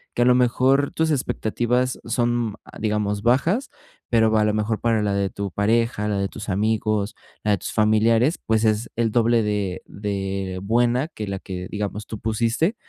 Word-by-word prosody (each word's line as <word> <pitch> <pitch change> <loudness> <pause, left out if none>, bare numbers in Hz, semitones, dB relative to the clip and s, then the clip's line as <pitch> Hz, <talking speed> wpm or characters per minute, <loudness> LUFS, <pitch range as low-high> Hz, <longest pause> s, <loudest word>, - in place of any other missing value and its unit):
que - - +1
a - - +2
lo 125 0 +5
mejor 130 +3 +3
tus 160 0 +1
expectativas 125 -1 0
son, 120 -2 0
ah, - - -13
digamos, 105 -1 -1
bajas, 165 - +2 0.4
pero 110 -2 +3
a 105 - +4
lo 105 - +1
mejor 110 +1 -1
para 115 -2 +2
la 100 -1 0
de 100 -1 0
tu 100 0 -4
pareja, 110 +2 +1
la 105 -1 0
de 100 - 0
tus 105 - -9
amigos, 110 +1 0 0.3
la 105 - +1
de 100 - +3
tus - - -5
familiares, 110 +6 +3
pues 110 0 +2
es 110 +1 +1
el 115 -1 +1
doble 115 0 +3
de 105 -3 -2
de 95 -2 -3
buena 120 +6 +2
que 110 -10 -6
la 100 -1 -3
que, 90 -1 -6
digamos, 105 0 -4
tú 110 - -6
pusiste, 115 - 0
110 Hz, 185 wpm, -23 LUFS, 105-120 Hz, 0.4 s, lo